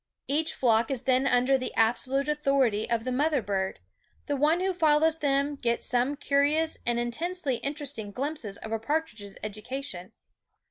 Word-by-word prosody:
Each 305 +3 0
flock 230 -2 +3
is 265 -3 -1
then 260 +1 +2
under 255 +1 +3
the 255 - -4
absolute 255 +5 +2
authority 275 -8 +1
of 230 -1 0
the 255 - -2
mother 290 +3 +2
bird; 195 -1 -2 0.5
and 285 -2 -1
one 310 +4 +3
who 380 +1 0
follows 320 -1 +3
them 280 0 +1
gets 235 -3 -1
some 250 +3 +1
curious 290 +3 +1
and 240 0 +1
intensely 280 +3 -2
interesting 280 -7 -4
glimpses 260 -4 -3
of 220 - -8
a 225 - -1
par 300 +8 0
tridge's 205 -9 -12
education. 215 -2 -6
270 Hz, 165 wpm, -28 LUFS, 235-295 Hz, 0.5 s, flock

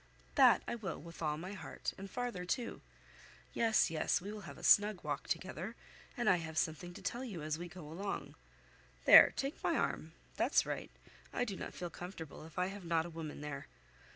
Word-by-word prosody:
"That 260 -4 +6
I - - -1
will, 210 -8 -4
with 170 0 -11
all 150 -2 0
my 185 +5 -6
heart, 185 -6 -5
and 195 +1 -8
farther, 245 -7 -3
too. 230 +6 -2 0.7
Yes, 225 -6 +3
yes 160 - +1
we 195 +3 -6
will 215 - -7
have - - -10
a - - -12
snug 205 -2 +5
walk - - -3
together, - - -3 0.4
and 240 -2 0
I 185 - +6
have 160 -2 -6
something 160 +3 -1
to 200 - -10
tell 240 +7 -2
you 195 -11 -5
as 155 +1 -2
we 175 - -5
go 165 -2 -10
along. 195 +6 -4 0.7
There, - - +11
take 275 +3 -3
my - - +2
arm; - - -1 0.2
that's - - +3
right; - - -4 0.4
I 245 - 0
do 205 -5 -4
not - - -6
feel 175 -1 -5
comfortable 165 -4 -8
if 160 - -17
I 180 - +2
have 195 +1 -6
not 165 -1 +1
a 175 - -7
woman 160 -3 -6
there. 145 -2 -5
180 Hz, 205 wpm, -35 LUFS, 160-210 Hz, 0.7 s, There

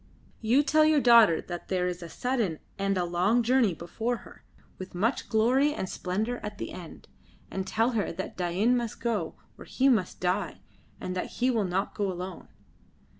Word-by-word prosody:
You 240 +6 +3
tell 310 +2 +4
your 310 -1 +4
daughter 230 - +6
that 175 -1 -7
there 185 -1 0
is 180 0 -3
a 170 - -8
sudden 230 -7 -1 0.2
and 195 0 +1
a 180 - +1
long 185 +8 +2
journey 235 -6 +3
before 225 +9 -3
her, - - -15 0.4
with 185 -1 -8
much 225 +8 0
glory 255 +6 +3
and 190 - -3
splendour 215 +8 -2
at 210 -1 -6
the - - -5
end. 175 -3 -10 0.4
And 190 0 -3
tell 230 +3 +1
her 220 -4 -1
that 190 +3 -6
Dain 185 +7 +1
must 235 -2 -3
go, 225 -8 -2 0.2
or - - -10
he 270 +1 +2
must 210 -8 +1
die, 180 0 -1 0.4
and 185 - -4
that 180 - -4
he 250 +1 +1
will 220 -4 +1
not 190 +2 -1
go 200 -2 -1
alone." 180 0 -7
210 Hz, 185 wpm, -28 LUFS, 180-240 Hz, 0.4 s, daughter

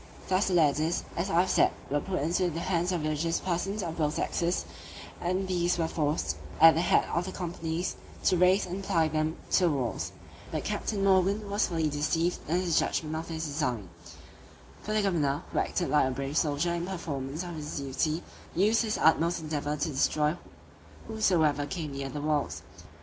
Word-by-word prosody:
Thus 185 +2 +2
the 185 - +1
ladders, 155 +1 +2
as 175 +4 -1
I 170 -1 +4
have 185 - -1
said, - - +4 0.2
were 145 - +2
put 185 -2 -2
into 175 +3 +1
the 165 0 -4
hands 175 0 0
of 175 -4 -1
religious 155 +2 0
persons 190 +3 -2
of 165 -1 -4
both 150 -1 +1
sexes, 170 - 0 0.6
and 185 +2 -1
these 175 -1 +1
were 165 -1 +1
forced, 145 - -1 0.2
at 165 0 +9
the 165 - +1
head - - +3
of 170 +1 0
the 190 - -5
companies, 170 -1 -3 0.3
to - - +4
raise 180 +2 +4
and 185 +2 -5
apply 165 -5 +2
them 155 +1 -1
to 185 - +4
the - - +4
walls: 130 -6 -2 0.4
but - - -2
Captain 200 -3 -2
Morgan 195 +2 +3
was 205 +1 +1
fully 165 -3 0
deceived 160 +4 0
in 175 +3 +1
his 175 -3 +2
judgment 155 0 -1
of 160 +1 -4
this 160 -1 -4
design; 125 - -2 0.9
for 215 - -4
the 215 -1 +2
governor, 155 -5 +1
who - - 0
acted 175 - -1
like 150 -3 +4
a - - 0
brave 135 +2 -4
soldier 155 +2 +1
in 170 +1 -2
performance 155 -4 -4
of 175 -1 -6
his 150 -1 -5
duty, 150 +4 -1 0.3
used 210 +6 +4
his 220 -2 -1
utmost 165 +2 +3
endeavour 150 -1 -2
to 155 +3 -1
destroy 150 +2 +1 0.7
whosoever 165 -10 +2
came 155 -1 -4
near 140 0 -4
the 145 +1 -5
walls. 145 - -1
165 Hz, 190 wpm, -29 LUFS, 150-180 Hz, 0.9 s, at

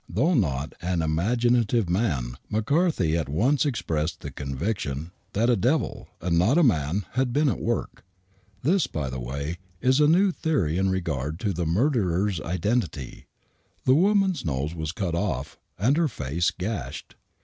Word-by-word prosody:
Though 135 - +2
not 75 - 0
an 90 -2 0
imaginative 115 +6 +2
man,, 80 - 0
McCarthy 110 - +1
at 80 -4 -1
once 130 - +2
expressed 80 - -2
the - - -6
conviction 70 +1 -3 0.2
that 115 +4 +2
a 120 - +4
devil, 125 - 0
and 85 -2 +1
not 110 - +3
a 175 - +5
man, 90 - +1
had 130 0 0
been 150 +4 +2
at 120 - 0
work. - - -2 0.6
This, 175 +5 +3
by 70 -5 -3
the 65 - -4
way, 70 +7 -4 0.2
is 130 +6 +3
a 150 - +5
new 185 +5 +4
theory 120 - 0
in 95 0 +2
regard 80 -5 -2
to 105 -3 0
the 85 -1 -2
murderer's 95 - +1
identity. 90 - -2 0.6
The 130 - +5
woman's 190 +3 +3
nose 75 0 -2
was 80 -2 -3
cut 90 -2 -3
off 85 - -2 0.2
and 120 +9 +3
her 170 -1 +3
face 85 - -1
gashed. 100 +4 -5
95 Hz, 160 wpm, -26 LUFS, 80-125 Hz, 0.6 s, a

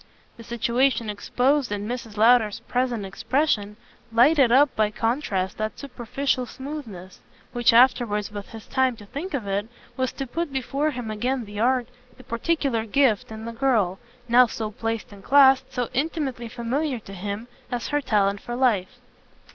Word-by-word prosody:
The 230 - -12
situation 235 0 +1
exposed 250 +5 0
in 205 0 -3
Mrs. 235 -3 -6
Lowder's 225 -1 +4
present 245 -4 -1
expression 210 0 -1 0.3
lighted 255 +2 +5
up 270 +2 +5
by 215 -1 +2
contrast 215 -5 -1
that 215 0 -3
superficial 255 0 -2
smoothness; 235 -12 -8 0.3
which 240 -1 +4
afterwards, 230 -4 +3
with 205 -1 -7
his 225 -2 -10
time 260 -2 +1
to 210 -2 -13
think 290 - -5
of 240 -7 -3
it, 200 +2 -2 0.3
was 260 -1 0
to 270 - -4
put 330 +4 -3
before 275 +3 -1
him 245 -6 -5
again 245 +3 -1
the 205 0 -8
art, 250 +1 +2 0.3
the 255 - -14
particular 250 0 -1
gift, 230 -4 +2
in 220 0 -7
the 230 - -4
girl, 225 -8 +1 0.3
now 245 +1 +6
so 220 -1 -4
placed 225 +1 -4
and 200 -1 -13
classed, 265 0 +5
so 250 -3 -2
intimately 270 -4 -2
familiar 250 +4 -2
for 195 -2 -12
him, 200 +4 -5 0.2
as 245 -1 -3
her 290 0 +1
talent 200 -5 +1
for 240 - -5
life. 245 -2 +1
240 Hz, 165 wpm, -24 LUFS, 215-265 Hz, 0.3 s, now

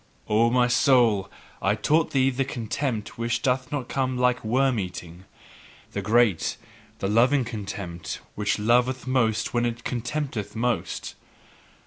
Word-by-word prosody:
O 110 +2 +3
my 125 0 +3
soul, 120 -5 +3 0.3
I - - +2
taught 160 +1 +2
thee 135 -1 +2
the 135 +1 0
contempt 120 -3 -3
which 115 0 -1
doth 125 -1 0
not 140 -4 -3
come 130 -2 -1
like 125 0 +2
worm 130 +2 +2
eating, 90 -1 -7 0.7
the - - -3
great, 110 -5 +2 0.4
the 100 - -2
loving 125 +5 +3
contempt, 100 -7 -6
which 105 0 0
loveth 125 +4 +2
most 115 -4 +1
where 120 -1 +1
it 120 0 -5
contemneth 120 -2 -3
most. 120 0 -2
120 Hz, 135 wpm, -25 LUFS, 110-130 Hz, 0.7 s, O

